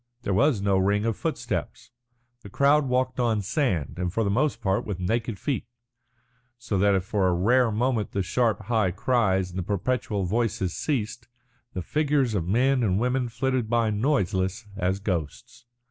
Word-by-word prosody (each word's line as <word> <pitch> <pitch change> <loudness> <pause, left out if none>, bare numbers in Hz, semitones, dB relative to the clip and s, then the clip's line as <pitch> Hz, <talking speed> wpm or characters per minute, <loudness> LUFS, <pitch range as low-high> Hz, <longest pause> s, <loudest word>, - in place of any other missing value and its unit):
There 100 - -1
was 120 -1 +2
no 100 -1 +2
ring 100 +3 +1
of 115 -2 0
footsteps. - - -4 0.5
The 100 - -11
crowd 140 +5 +3
walked 130 0 0
on 115 -4 +1
sand 95 - -1
and 90 -1 -1
for 115 +5 0
the 100 - 0
most 135 +2 +1
part 95 -4 0
with 100 -4 -5
naked 110 +4 -1
feet, 140 -1 -3 0.9
so 105 -5 -2
that 100 0 +4
if 95 - 0
for 100 -2 0
a 90 - +2
rare 120 +6 +3
moment 115 0 0
the 100 - -1
sharp 115 +3 0
high 110 -2 +1
cries 95 -2 +1
and 90 - -4
the - - -2
perpetual 105 +2 -1
voices 100 -3 -1
ceased, 120 -4 -3 0.5
the 90 - -4
figures 145 - +1
of 90 -5 -1
men 130 +6 +2
and 100 -4 +1
women 125 +1 0
flitted 130 -1 -1
by 115 -2 +2
noiseless 105 -4 0
as 95 +1 -1
ghosts. 95 - -4
110 Hz, 175 wpm, -26 LUFS, 95-125 Hz, 0.9 s, that